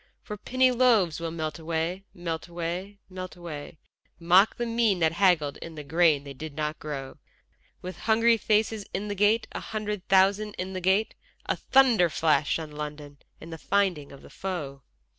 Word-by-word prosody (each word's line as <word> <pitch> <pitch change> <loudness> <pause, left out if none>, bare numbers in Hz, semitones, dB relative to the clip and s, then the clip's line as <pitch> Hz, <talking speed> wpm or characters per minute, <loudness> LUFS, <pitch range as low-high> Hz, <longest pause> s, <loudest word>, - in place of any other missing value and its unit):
For 210 - -6
penny 255 +5 +2
loaves 225 - +3
will 165 0 -3
melt 155 -1 -4
away, 165 +4 -3
melt 165 -2 -5
away, 175 +4 -5
melt 185 -1 -8
away, 160 -3 -8 0.4
Mock 180 +5 +5
the 240 - -2
mean 230 -4 +2
that 160 -2 +2
haggled 170 -5 +2
in 165 -1 -9
the 150 - -7
grain 155 -1 +3
they 140 -1 -8
did 150 +2 -8
not 150 0 -3
grow; 140 -3 -6 0.6
With 185 +1 -7
hungry 230 +1 +3
faces 215 0 +1
in 205 +2 -3
the - - -1
gate, 210 +3 +2
a - - -5
hundred 210 -3 -5
thousand 200 +2 +3
in 185 +1 -5
the 185 - -4
gate, 190 +4 +2 0.3
A - - 0
thunder 245 -10 +4
flash 155 -1 +1
on 160 -2 -7
London 150 -1 -7 0.2
and 165 +1 -10
the 160 - -8
finding 185 -8 0
of 140 - -13
the - - -14
foe. 150 -8 -5
175 Hz, 180 wpm, -27 LUFS, 155-205 Hz, 0.6 s, Mock